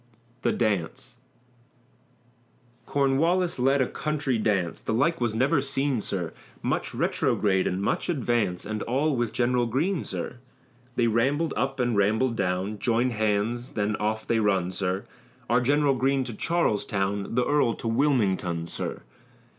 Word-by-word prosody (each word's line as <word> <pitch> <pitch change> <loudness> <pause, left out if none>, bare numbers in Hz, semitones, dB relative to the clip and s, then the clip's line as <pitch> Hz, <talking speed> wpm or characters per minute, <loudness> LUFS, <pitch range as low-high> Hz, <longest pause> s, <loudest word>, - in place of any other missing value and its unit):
THE - - +2
DANCE 100 -8 -2 1.7
Cornwallis 160 +5 +2
led 135 +2 +3
a - - -2
country 145 -5 -1
dance, 100 -6 0
The 110 - -1
like 145 +5 +1
was 115 -2 0
never 135 +5 +2
seen, 135 -2 0
sir, 90 -5 -3 0.3
Much - - -1
retrograde 95 -3 +1
and 90 - -1
much - - -1
advance, 120 - 0
And 105 +1 -3
all 140 +5 +1
with 120 -2 -1
General 120 0 +1
Greene, 155 - 0
sir. 90 +5 -5 0.6
They 120 - +2
rambled 135 +8 +1
up 135 +4 -1
and 120 -2 +1
rambled 110 +5 +2
down, 95 +1 -1
Joined 120 +3 +1
hands, 110 +3 -1
then 105 -1 0
off 110 +1 -2
they 115 - +1
run, 95 -4 +1
sir. 95 0 -2 0.4
Our 120 +2 +3
General 145 +2 +3
Greene 135 +1 +1
to 125 -2 -6
Charlestown, 105 - -1
The 125 0 +2
earl 145 -6 +2
to - - -6
Wilmington, 105 - +1
sir. - - -5
120 Hz, 145 wpm, -26 LUFS, 105-135 Hz, 1.7 s, led